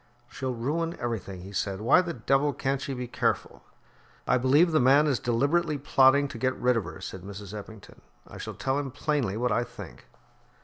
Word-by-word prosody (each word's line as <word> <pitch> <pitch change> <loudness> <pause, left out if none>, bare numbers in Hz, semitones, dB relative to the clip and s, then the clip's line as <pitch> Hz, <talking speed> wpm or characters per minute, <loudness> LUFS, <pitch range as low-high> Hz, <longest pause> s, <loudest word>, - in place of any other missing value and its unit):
"She'll 130 -1 -4
ruin 165 +8 -2
everything," 100 -6 -4
he 95 +2 -10
said. 100 -1 -2
"Why 115 +11 +5
the 170 -2 -5
devil 135 +5 +1
can't 135 +1 -2
she 135 - -4
be 125 0 -4
careful?" - - -1 0.6
"I 125 - +2
believe 145 +7 +4
the 155 - +3
man 135 +4 +5
is 140 -5 +1
deliberately 145 +7 +1
plotting 140 0 +4
to 120 - -8
get 130 +2 0
rid 125 0 +2
of 115 -5 -1
her," 90 - -8
said 95 - -7
Mrs. 100 +1 -9
Eppington. 105 0 -10 0.2
"I - - -11
shall - - -6
tell 135 +1 -1
him 140 -2 -3
plainly 130 -7 -1
what 125 +2 0
I 120 - +2
think." - - -11
130 Hz, 195 wpm, -27 LUFS, 115-145 Hz, 0.6 s, Why